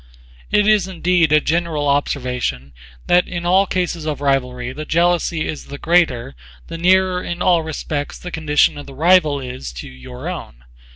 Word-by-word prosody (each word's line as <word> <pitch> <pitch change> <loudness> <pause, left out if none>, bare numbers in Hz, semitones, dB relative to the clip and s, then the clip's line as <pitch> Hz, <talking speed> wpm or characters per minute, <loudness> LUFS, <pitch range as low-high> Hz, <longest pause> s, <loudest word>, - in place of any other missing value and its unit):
It 210 0 +3
is 210 -3 +3
indeed 175 -3 +1
a 150 - +6
general 160 -2 -1
observation 125 - -1 0.3
that 180 0 +3
in 175 -1 -5
all 190 +3 +3
cases 175 -3 -2
of 155 -2 -3
rivalry 125 -3 -1
the 155 +3 -6
jealousy 170 0 +1
is 155 - -6
the 140 - -8
greater 160 - +1 0.3
the - - -7
nearer 185 +1 +3
in 175 0 -5
all 180 -2 +3
respects 155 -2 -4
the 180 - -8
condition 150 -2 +2
of 145 - -10
the 135 - -11
rival 155 -2 +4
is 125 - -7
to 60 - -8
your 65 -1 -10
own. - - -7
155 Hz, 170 wpm, -19 LUFS, 135-175 Hz, 0.3 s, a